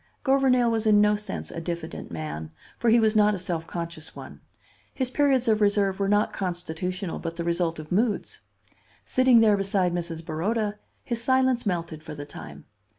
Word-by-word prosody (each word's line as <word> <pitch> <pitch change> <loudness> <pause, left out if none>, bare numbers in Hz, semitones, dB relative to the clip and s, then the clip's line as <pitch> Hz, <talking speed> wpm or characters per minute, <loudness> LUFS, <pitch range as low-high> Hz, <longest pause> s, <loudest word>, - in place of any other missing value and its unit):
Gouvernail 265 -3 +3
was 225 -1 0
in 210 -1 +6
no 210 0 +4
sense 210 0 -6
a 165 - -5
diffident 170 -1 -5
man, 80 -1 -5 0.3
for 235 - +2
he 235 +1 +6
was 220 -1 +2
not 210 -1 +4
a - - -4
self 170 -2 -4
conscious 170 -2 -6
one. - - -10 0.5
His 255 -2 -2
periods 270 -3 +2
of 215 -1 +3
reserve 200 -2 +2
were 195 0 +1
not 205 +1 +2
constitutional, 180 0 -3
but 165 0 -5
the 170 - -3
result 170 0 0
of 155 0 -9
moods. 210 +3 0 0.6
Sitting 255 -2 +5
there 210 -2 +5
beside 195 -3 +1
Mrs. 165 -2 -4
Baroda, 205 +6 -1 0.2
his 235 -1 -2
silence 260 -1 +2
melted 170 -4 -2
for 155 - -8
the 145 0 -7
time. 75 - -10
195 Hz, 180 wpm, -26 LUFS, 170-225 Hz, 0.6 s, in